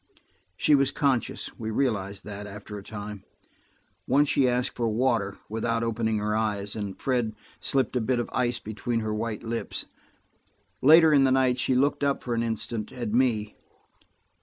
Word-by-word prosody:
She 150 - +3
was 140 -2 +5
conscious; 135 -4 0
we 110 - -3
realized 105 -5 -1
that 105 0 -7
after 105 +1 -9
a 100 - -6
time. 105 -1 -7 0.8
Once 140 +2 +3
she 130 -2 +3
asked 125 0 0
for 120 - 0
water, 110 -3 0
without 115 +1 -1
opening 110 -1 0
her 105 +1 -1
eyes, 105 -2 -1
and 100 -3 -5
Fred 120 -5 0 0.2
slipped 135 -2 0
a 125 - +2
bit 125 +3 +1
of 120 - -1
ice 120 -1 +1
between 115 +1 -3
her 110 -1 -2
white 110 0 -3
lips. 115 0 -3 1.0
Later 160 +2 +7
in 140 -2 +6
the 135 - +4
night 130 -1 +3
she 130 - +1
looked 140 +3 +2
up 140 -1 +1
for 120 - -2
an 115 - 0
instant, 115 -1 -2
at 120 -4 -4
me. 115 -4 +1
115 Hz, 170 wpm, -27 LUFS, 105-130 Hz, 1.0 s, Later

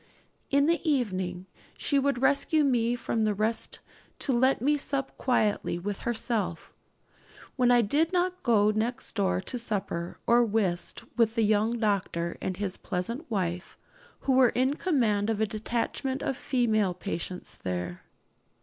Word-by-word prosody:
In 280 0 +4
the 335 +2 +2
evening 185 -9 -1 0.3
she 280 - +1
would 275 -2 0
rescue 285 +3 +3
me 240 -3 +2
from 230 -2 -1
the 210 -1 +1
rest 220 +3 -1 0.4
to 270 - 0
let 260 +3 +3
me 290 +5 +2
sup 275 -1 -2
quietly 215 -8 +1
with 195 +3 -4
herself, 230 -7 -2 0.8
when 250 -2 +3
I 245 -1 +5
did 300 +10 +1
not 365 0 0
go 215 -3 +4
next 235 +4 -2
door 195 -4 +1
to 245 +6 -3
supper 195 -6 -3
or 240 +1 +5
whist 200 -6 -1
with 230 -1 +3
the 230 - +2
young 215 +2 +2
doctor 190 -6 -1
and 185 -1 -3
his 195 -2 -3
pleasant 230 - -4
wife, 180 -4 -3 0.4
who 275 - 0
were 255 -2 +6
in 260 +4 +1
command 230 - +1
of 220 -2 0
a 220 - +3
detachment 235 +5 -2
of 270 - -1
female 215 -8 +1
patients 180 -1 -5
there. 90 -1 -4
225 Hz, 150 wpm, -28 LUFS, 200-260 Hz, 0.8 s, were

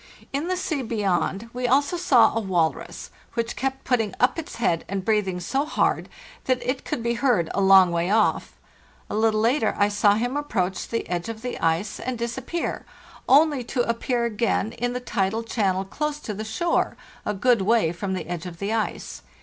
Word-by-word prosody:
In 285 +5 -1
the 370 0 0
sea 315 -6 -2
beyond 210 -1 -1
we 250 0 -1
also 285 +6 +2
saw 275 -11 +4
a - - +2
walrus, 175 -6 -1 0.2
which 230 -1 -2
kept 270 +1 -3
putting 225 -6 0
up 250 +6 +3
its 325 - -7
head 170 -8 0
and 195 -1 -3
breathing 205 -4 +1
so 265 +11 -1
hard 305 - 0 0.4
that 255 -1 +2
it 255 +1 -1
could 235 - -3
be 235 0 +1
heard 235 -9 +1
a 200 - 0
long 190 -2 +7
way 170 +1 0
off. 215 0 +2 0.6
<A - - -2
little 215 0 +2
later 230 0 +2
1 205 0 +3
saw 205 0 +4
him 245 +5 -1
approach 190 -11 -1
the 230 - -3
edge 175 +3 -3
of 225 0 -7
the 250 - -4
ice 165 +6 0
and 255 -1 -3
disappear, 245 +8 -3 0.5
only 285 -1 +5
to 245 0 -1
appear 235 +1 0
again 220 -1 0
in 245 +1 -2
the 250 - -2
tidal 220 -2 -1
channel 195 -4 0
close 300 +8 -3
to 215 - -5
the 210 +2 -5
shore, 275 +11 0 0.3
a 210 - -2
good 235 +2 +3
way 210 -4 +3
from 190 +2 -4
the - - -4
edge 175 0 -5
of 170 -2 -9
the 200 +4 -2
ice. 220 - -3
225 Hz, 195 wpm, -24 LUFS, 195-250 Hz, 0.6 s, long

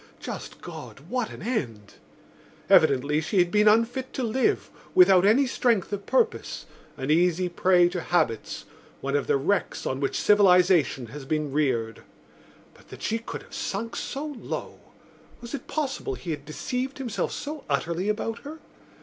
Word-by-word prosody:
Just - - -7
God, - - -9
what 250 -4 -1
an - - -10
end! 120 - -3 0.8
Evidently 145 0 +4
she 160 +6 -2
had 175 -1 +4
been 210 0 +4
unfit 230 +4 +2
to 260 - -2
live, 260 - 0 0.2
without 185 +1 +7
any 255 +7 +5
strength 230 -6 +1
of 200 0 -4
purpose, 470 -2 0 0.3
an 135 +2 -2
easy 175 +2 +3
prey 175 0 +4
to 175 -1 -3
habits, 120 -11 -1 0.4
one 140 +1 -1
of 145 - 0
the - - +3
wrecks 185 +9 -1
on 130 - -2
which 140 - -1
civilisation 180 -9 +4
has 145 +3 -8
been 150 +1 -2
reared. 125 -6 0 0.7
But - - -21
that - - -11
she 225 +1 0
could 230 - -7
have - - -18
sunk 225 +4 -3
so 280 +3 -4
low! 290 -5 -6 0.6
Was 235 -1 -9
it 280 - -5
possible 310 +7 -2
he 175 - -6
had 145 -2 -5
deceived 250 - -4
himself 255 -6 -2
so 295 0 -6
utterly 170 +7 -1
about 225 +1 -2
her? 300 +3 -9
185 Hz, 160 wpm, -26 LUFS, 150-240 Hz, 0.8 s, without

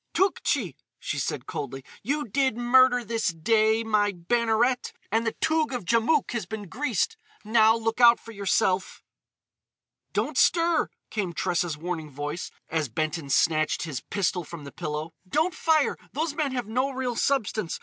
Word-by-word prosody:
"Tougtchi!" 280 - +1 0.2
she - - -3
said - - -3
coldly, 135 -2 -5 0.2
"you 290 +4 -2
did 260 +1 +1
murder 245 0 +5
this 225 0 -1
day, 220 +6 +2
my 210 -2 +2
Banneret, 235 +6 +1 0.2
and 225 +2 +1
the 225 - 0
Toug 315 -3 +1
of 235 -7 -5
Djamouk 235 - +2
has 230 -7 -3
been 210 -1 -6
greased. 245 - -1 0.3
Now 220 0 +5
look 225 +1 -2
out 235 -1 +8
for 230 - -11
yourself!" 190 -2 0 1.1
"Don't - - -1
stir!" 335 -1 +3 0.2
came 195 -5 -2
Tressa's 175 -3 -1
warning 160 -1 -4
voice, 145 +4 -5 0.2
as 155 -4 -1
Benton 155 +4 -3
snatched 155 +2 +2
his 150 -7 -4
pistol 185 -2 -1
from 165 -1 -9
the 140 - -9
pillow. 155 0 -5 0.2
"Don't 320 - +1
fire! 315 -2 +2 0.2
Those 310 +1 -1
men 295 -2 -1
have 245 -3 -2
no 250 +6 0
real 255 -2 -3
substance! 220 -9 0
220 Hz, 155 wpm, -26 LUFS, 170-255 Hz, 1.1 s, out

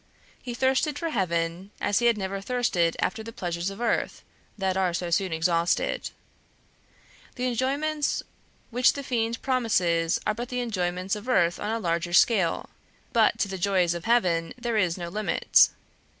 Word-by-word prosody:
He 240 -2 -6
thirsted 265 +4 +1
for 330 +1 -3
heaven 170 - -1
as 205 - +1
he 240 - +3
had 235 -2 +3
never 195 0 -3
thirsted 195 -8 0
after 220 +4 -1
the 225 +1 -8
pleasures 175 -3 -3
of 195 +2 -9
earth, 240 - -1 0.3
that 190 -2 0
are 185 -2 +1
so 175 -1 -3
soon 185 +1 +1
exhausted. 165 +1 0 1.3
The 250 - -2
enjoyments 280 +5 0 0.5
which 250 +2 +4
the 280 - -6
fiend 235 -2 -1
promises 180 -10 +1
are 215 - +1
but 240 +3 -6
the 250 - -2
enjoyments 185 -4 -2
of 210 +4 -8
earth 175 -8 +2
on 210 - -3
a 225 - 0
larger 175 -4 -2
scale, 190 -3 +3 0.4
but 225 -3 +4
to - - 0
the 190 -1 -5
joys 180 -2 +2
of 170 0 -6
heaven 175 -9 +1
there 240 -2 -2
is 180 -4 +1
no 175 -1 -5
limit. 210 +5 +3
195 Hz, 165 wpm, -26 LUFS, 175-240 Hz, 1.3 s, which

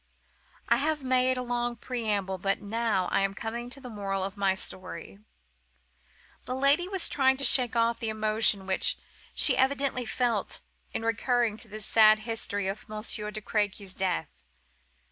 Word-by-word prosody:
I - - +4
have 300 0 -1
made 255 0 +2
a 250 - -2
long 240 0 -2
preamble, 210 -6 -2
but 195 +2 0
now 215 -3 -1
I - - +2
am 195 0 -1
coming 235 +3 -5
to 275 - -4
the 260 - -10
moral 195 -4 -3
of 195 +1 -4
my 195 -2 +1
story." 185 0 -5 1.3
My 255 - -2
lady 280 +6 +3
was 385 -2 0
trying 265 -2 +2
to 275 - -5
shake 245 -2 +5
off 230 0 +2
the 225 - -3
emotion 215 -2 +2
which 190 0 +1 0.4
she - - +6
evidently 265 -2 +1
felt 230 -1 -1 0.3
in - - -4
recurring 230 -1 +1
to 225 - -4
this 215 0 -6
sad 215 -1 +5
history 215 -3 -3
of 200 +3 -5
Monsieur 215 0 -3
de 215 0 -6
Crequy's 205 -2 -2
death. 190 - -2
225 Hz, 165 wpm, -28 LUFS, 200-250 Hz, 1.3 s, she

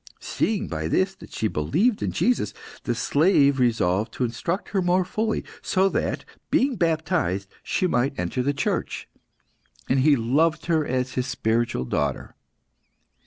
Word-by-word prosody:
Seeing 215 -3 -1
by 80 -1 -3
this 190 - +1
that 190 - -14
she 110 - -1
believed 170 - +1
in - - -1
Jesus, 250 0 0 0.3
the 120 - 0
slave 140 +1 +3
resolved 110 -4 +1
to - - -2
instruct 125 - -2
her 195 - 0
more 180 +1 +2
fully, 220 +4 -1 0.2
so 190 +1 +2
that, - - -2 0.2
being 265 0 +2
baptised, 160 - 0
she - - -1
might 135 -3 +1
enter 90 +8 -1
the 140 +3 +1
Church; 140 - -2 0.8
and 130 - +2
he 145 +2 +5
loved 145 +7 +1
her 160 -3 +2
as 130 0 -1
his 125 0 -1
spiritual 115 - 0
daughter. 70 +2 -2
140 Hz, 150 wpm, -24 LUFS, 115-180 Hz, 0.8 s, he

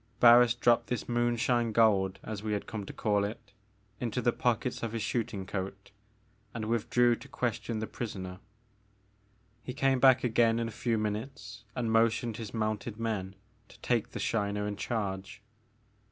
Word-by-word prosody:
Barris 120 0 +7
dropped 120 -1 +3
this 125 -3 -3
moonshine 120 0 +1
gold," 100 -4 +3
as 110 -2 -5
we 105 0 -2
had 100 - -2
come 105 -3 -6
to - - -5
call 105 -2 +1
it, 100 0 -6 0.5
into 120 0 -2
the 120 -1 +2
pockets 125 0 0
of 115 -1 -3
his 115 -2 -2
shooting 105 -5 -2
coat, 95 +1 -5 0.6
and 110 -2 -3
withdrew 120 +2 +2
to 120 - -12
question 120 -3 -2
the 110 - -2
prisoner. 95 -6 -6 1.2
He 125 +3 -7
came 135 -1 +2
back 130 -1 +6
again 115 -1 +3
in 115 0 -1
a - - -6
few 115 +1 -1
minutes 105 0 -4
and 120 -3 -1
motioned 115 0 +2
his 110 -3 -6
mounted 110 -1 -2
men 105 -4 -3 0.3
to - - -18
take 120 -3 0
the - - -6
Shiner 105 -2 -1
in 105 0 -3
charge. 100 -2 -4
115 Hz, 165 wpm, -30 LUFS, 105-120 Hz, 1.2 s, Barris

